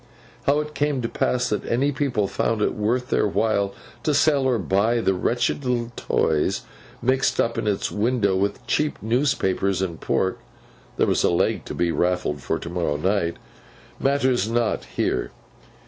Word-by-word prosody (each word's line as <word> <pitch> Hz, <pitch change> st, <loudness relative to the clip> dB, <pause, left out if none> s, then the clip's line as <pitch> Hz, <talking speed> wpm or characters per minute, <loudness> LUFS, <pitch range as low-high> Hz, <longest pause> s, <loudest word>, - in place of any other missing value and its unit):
How 145 Hz, +2 st, +4 dB
it 150 Hz, 0 st, -7 dB
came 145 Hz, -4 st, 0 dB
to -, -, 0 dB
pass 125 Hz, +1 st, 0 dB
that 105 Hz, -, -1 dB
any 135 Hz, +5 st, +1 dB
people 130 Hz, -8 st, 0 dB
found 110 Hz, +1 st, 0 dB
it -, -, +1 dB
worth 120 Hz, +4 st, -1 dB
their -, -, +3 dB
while 100 Hz, -1 st, 0 dB, 0.3 s
to 150 Hz, -, +1 dB
sell 140 Hz, -2 st, +3 dB
or 130 Hz, -2 st, +2 dB
buy 105 Hz, +4 st, +1 dB
the 95 Hz, -4 st, +2 dB
wretched 120 Hz, +8 st, 0 dB
little 120 Hz, -2 st, -1 dB
toys, 75 Hz, -2 st, 0 dB, 0.4 s
mixed 130 Hz, +2 st, +2 dB
up 115 Hz, -, +1 dB
in -, -, -2 dB
its 100 Hz, -2 st, 0 dB
window 105 Hz, -2 st, +1 dB
with 100 Hz, +2 st, -1 dB
cheap 150 Hz, 0 st, 0 dB
newspapers 110 Hz, -6 st, +1 dB
and 90 Hz, -4 st, -3 dB
pork 95 Hz, -, 0 dB, 0.6 s
(there -, -, +3 dB
was -, -, +1 dB
a -, -, +4 dB
leg 85 Hz, -, +1 dB
to -, -, -6 dB
be 85 Hz, -1 st, +1 dB
raffled 90 Hz, -5 st, 0 dB
for 80 Hz, +4 st, -1 dB
to -, -, -8 dB
morrow 85 Hz, -4 st, -1 dB
night), 90 Hz, 0 st, 0 dB, 0.6 s
matters 130 Hz, -5 st, +2 dB
not 115 Hz, -1 st, 0 dB
here. -, -, -1 dB
115 Hz, 170 wpm, -23 LUFS, 95-130 Hz, 0.6 s, How